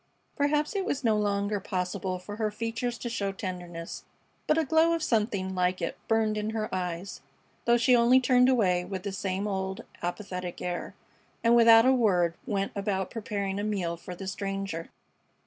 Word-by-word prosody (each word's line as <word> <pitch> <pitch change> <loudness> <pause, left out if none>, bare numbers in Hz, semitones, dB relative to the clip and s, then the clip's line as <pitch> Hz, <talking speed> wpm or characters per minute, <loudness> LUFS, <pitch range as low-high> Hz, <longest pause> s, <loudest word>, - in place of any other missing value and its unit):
Perhaps 295 +4 +1
it 390 - 0
was 280 -6 -2
no 225 -2 +3
longer 205 0 0
possible 185 -1 -2
for 205 +3 -8
her 215 -1 0
features 230 +3 -3
to 240 - -5
show 205 -4 -2
tenderness, 180 -3 -6 0.4
but 305 - +3
a 320 - +2
glow 320 +4 +4
of 330 -1 -1
something 210 -6 0
like 180 0 +1
it - - -2
burned 220 -1 +2
in 210 +1 -2
her 215 -1 -3
eyes, 180 -1 -4 0.4
though 240 0 +5
she 245 +1 +4
only 240 +2 +6
turned 250 0 +4
away 185 -8 +3
with 185 0 -5
the 200 - -3
same 195 +1 -2
old 190 -1 -3 0.2
apathetic 180 0 -4
air, 175 -1 -4 0.5
and 235 +1 +5
without 230 -1 +8
a 260 - +6
word 185 -9 +3
went 200 -4 -1
about 195 -2 -1
preparing 200 -3 -3
a - - -2
meal 190 -5 -1
for 180 +2 -9
the 195 - -7
stranger. 195 -3 -4
200 Hz, 180 wpm, -28 LUFS, 185-230 Hz, 0.5 s, without